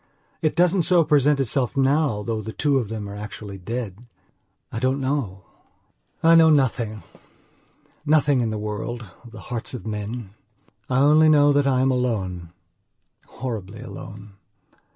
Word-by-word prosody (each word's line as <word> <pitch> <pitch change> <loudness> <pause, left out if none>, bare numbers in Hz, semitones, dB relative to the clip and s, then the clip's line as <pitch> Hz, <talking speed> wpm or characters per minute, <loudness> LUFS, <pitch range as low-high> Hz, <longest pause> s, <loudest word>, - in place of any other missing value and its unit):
It 155 - 0
doesn't 180 +1 +3
so 170 0 +4
present 150 -1 +3
itself 135 0 -1
now 135 -5 +2
though 110 0 -3
the 110 +1 -7
two 145 -2 +1
of 115 -5 -4
them 110 -2 -5
are 100 - -7
actually 105 -1 -8
dead. 110 0 -5 0.7
I 110 - -4
don't 130 +3 0
know.... 130 -9 -2 0.8
I 165 +1 +6
know 165 -1 +7
nothingnothing 120 -7 +1 1.4
in 115 - 0
the 110 - -3
worldof 105 +1 -5 0.2
the 110 -1 -11
hearts 120 +1 -5
of 120 - -8
men. 105 0 -5 0.6
I 130 +1 +2
only 155 +2 +5
know 145 -1 +5
that 140 0 +2
I 130 -2 +2
am 135 - +2
alonehorribly 100 +1 -6
alone. 100 -1 -10
120 Hz, 140 wpm, -23 LUFS, 105-140 Hz, 1.4 s, know